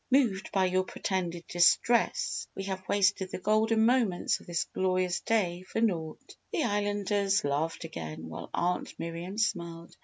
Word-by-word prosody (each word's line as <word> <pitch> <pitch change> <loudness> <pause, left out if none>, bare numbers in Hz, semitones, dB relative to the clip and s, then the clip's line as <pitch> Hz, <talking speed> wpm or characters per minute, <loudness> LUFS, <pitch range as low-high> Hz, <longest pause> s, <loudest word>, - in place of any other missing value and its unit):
Moved 235 -7 +2
by 190 -1 +3
your 185 0 +2
pretended 175 -2 -3
distress 175 +7 +2
we 195 - -4
have 190 -1 -3
wasted 200 -1 +2
the - - -4
golden 220 +3 +3
moments 230 -7 +2
of - - -17
this 170 -2 0
glorious 185 -1 +1
day 180 -6 0
for 185 - -4
naught!" 170 -8 -2 0.2
The 315 - 0
Islanders 205 -1 +1
laughed 150 +4 -1
again 80 - -6
while 80 - -7
Aunt 180 +1 -1
Miriam 170 +4 -5
smiled. 170 -5 -2
185 Hz, 150 wpm, -29 LUFS, 170-205 Hz, 0.2 s, by